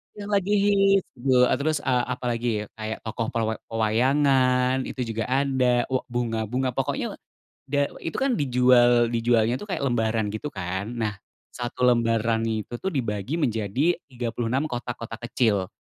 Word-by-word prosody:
Yang 205 0 -7
lagi 200 0 +1 0.5
hits. - - -32
Eee, 125 0 +3
terus 155 +2 0
eee, 125 -1 +1
apalagi 120 -1 -2 0.3
kayak 110 0 -5
tokoh 115 0 -3
pelwa 110 -1 0
pewayangan 130 +3 +2
itu 130 - -5
juga 110 -1 -2
ada 130 -2 +1
wa 130 -1 0
bunga-bunga 120 +1 -1
pokoknya 135 +3 -2 0.5
da 145 +1 +2 0.2
itu 165 - -4
kan 270 -1 +1
dijual 125 -3 +4
dijualnya 115 -1 +2
tuh 205 - -9
kayak 180 -7 -2
lembaran 110 -4 0
gitu 110 +7 -4
kan. 95 -2 -4
Nah 110 -2 -1 0.4
satu 125 +1 -2
lembaran 115 -2 +2
itu 110 +1 -4
tuh 190 - -1
dibagi 120 - -2
menjadi 125 - +1 0.2
36 120 +2 -2
kotak-kotak 120 -3 -6
kecil. 100 -8 +1
120 Hz, 140 wpm, -25 LUFS, 115-130 Hz, 0.5 s, dijual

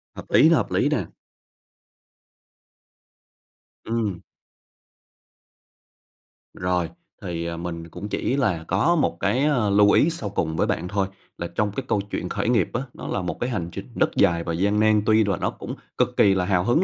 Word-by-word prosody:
Hợp - - -8
lý, 160 - +6
hợp 150 -10 +2
lý - - +2
nè. - - 0 2.8
Ừm. 110 -6 -1 2.3
Rồi, 90 -1 -1 0.3
thì, 85 -4 -4
à, 85 0 -4
mình 85 -1 -6
cũng 90 +5 -7
chỉ 130 - -1
là 90 -11 0
có 105 - +2
một 155 - +1
cái, 130 +3 +1
ơ, 125 -9 +2
lưu 100 +1 +5
ý 160 - +4
sau 160 -11 -4
cùng 80 -5 -2
với - - +1
bạn 90 - -1
thôi, 100 0 0 0.3
là 85 - -4
trong 105 +3 -1
cái 130 +6 -5
câu 100 - +1
chuyện - - -3
khởi - - -1
nghiệp 115 -8 +2
á, 120 - -1
nó - - -8
là 100 - -1
một 90 - -4
cái 120 - -1
hành 90 -9 -3
trình - - -7
rất - - +2
dài 85 -1 +3
và 85 - -3
gian 100 +5 +1
nan, 110 -1 +4
tuy 110 0 +4
là 100 -3 0
nó - - -1
cũng - - -7 0.2
cực - - 0
kỳ 100 - +5
là 95 -1 0
hào 90 -2 +2
hứng 120 - +3
100 Hz, 185 wpm, -24 LUFS, 90-115 Hz, 2.8 s, lý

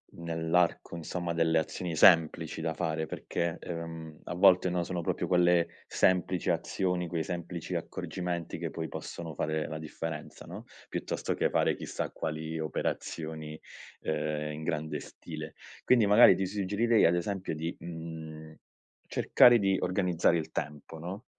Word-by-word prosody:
nell’arco, 85 +1 0
insomma, 85 +1 -3
delle 80 -1 +3
azioni 85 +1 -3
semplici 80 -1 +5
da 80 0 -1
fare, 80 -2 -1
perché, 85 +2 -3
ehm, 80 -2 -7
a - - -5
volte, 90 +1 +5
no, 90 0 0
sono 90 0 -3
proprio - - -1
quelle 90 -1 +4 0.2
semplici 90 -1 +1
azioni, 90 -2 0
quei 85 -1 -2
semplici 85 0 -4
accorgimenti 90 -2 -4
che - - -4
poi - - -4
possono 80 -3 -7
fare 80 0 -1
la 80 - -5
differenza, 80 0 -6
no, - - -8 0.2
piuttosto - - -2
che - - +1
fare - - +2
chissà - - -4
quali 80 +1 -4
operazioni, 80 0 -4 0.4
uhm, 75 0 -2
in 80 - -7
grande 80 0 -2
stile. - - -8 0.3
Quindi, 120 -5 +4
magari, 105 +4 +8
ti 95 -1 -1
suggerirei, 105 +4 +2
ad 85 - +5
esempio 95 0 -2
di, 80 +2 -4
mhmm, 80 -2 -8 0.5
cercare 120 -1 +6
di 95 -1 +2
organizzare 90 -2 +2
il 80 - -4
tempo, 75 +2 -5
no, 90 +5 -7
85 Hz, 145 wpm, -30 LUFS, 80-90 Hz, 0.5 s, magari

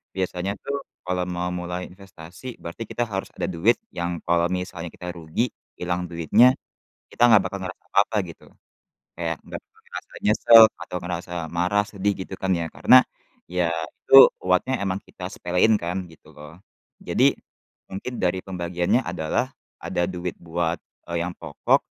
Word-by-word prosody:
biasanya 95 +1 -2
tuh 140 0 -3 0.2
kalau 90 0 -1
mau 90 0 -2
mulai 90 0 -4
investasi 95 +5 -11
berarti 85 +7 -6
kita 120 - -1
harus 95 -2 -3
ada - - -1
duit 95 +6 +3 0.2
yang 85 0 -2
kalau 85 0 +3
misalnya 90 -2 -4
kita 90 - -8
rugi, 85 +9 -2 0.3
ilang 90 0 -2
duitnya, 85 - +5 0.6
kita - - -3
nggak 110 -3 +7
bakal 100 - -6
ngerasa 95 0 -7
apa-apa, 105 +2 +3
gitu. 85 - -13 0.7
Kayak 80 -2 -2
nggak - - -7 0.2
ngerasa - - -9
nyesel 115 +2 +8 0.2
atau 90 - -6
ngerasa 90 0 -5 0.2
marah, 90 +4 +1
sedih 100 -1 0
gitu - - -15
kan 95 0 +1
ya, 85 - -2
karena 130 - +7 0.5
ya 90 -2 +1 0.3
itu 135 0 +10 0.2
buatnya 90 +8 +1
emang 95 0 -2
kita 90 -1 -8
sepelein 90 +5 +2
kan, 90 +2 -3
gitu 80 - -18
loh. 75 +4 -12 0.4
Jadi - - +3 0.6
mungkin 120 +6 -5
dari 90 0 +1
pembagiannya 90 +3 0
adalah 85 +9 -1 0.3
ada 85 - -1
duit 90 -1 -4
buat, 85 0 -1 0.3
eee, 85 0 -2
yang 90 - -4
pokok, - - +1
90 Hz, 155 wpm, -24 LUFS, 85-100 Hz, 0.7 s, itu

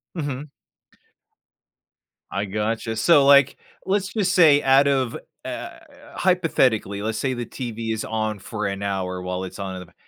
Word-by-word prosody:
Mhm. 145 -2 -4 1.8
I 100 +2 -2
gotcha, 110 +2 -2
so, 140 +4 +5
like, 140 -1 +6 0.3
let's 195 0 -1
just 200 -4 +1
say 155 -5 +6
out 135 +1 +5
of, 130 -4 0 0.3
uh - - -6 0.4
Hypothetically, 130 - +1
let's 110 0 -2
say 130 -1 -1
the 120 -1 -4
TV 115 -3 -5
is 110 - -3
on 110 -2 -2
for 105 +1 -5
an 100 0 -3
hour 95 -2 -3
while 90 0 -4
it's 95 - -8
on 95 -1 -4
in - - -6
the - - -10
ba 85 - -24
115 Hz, 160 wpm, -23 LUFS, 100-140 Hz, 1.8 s, like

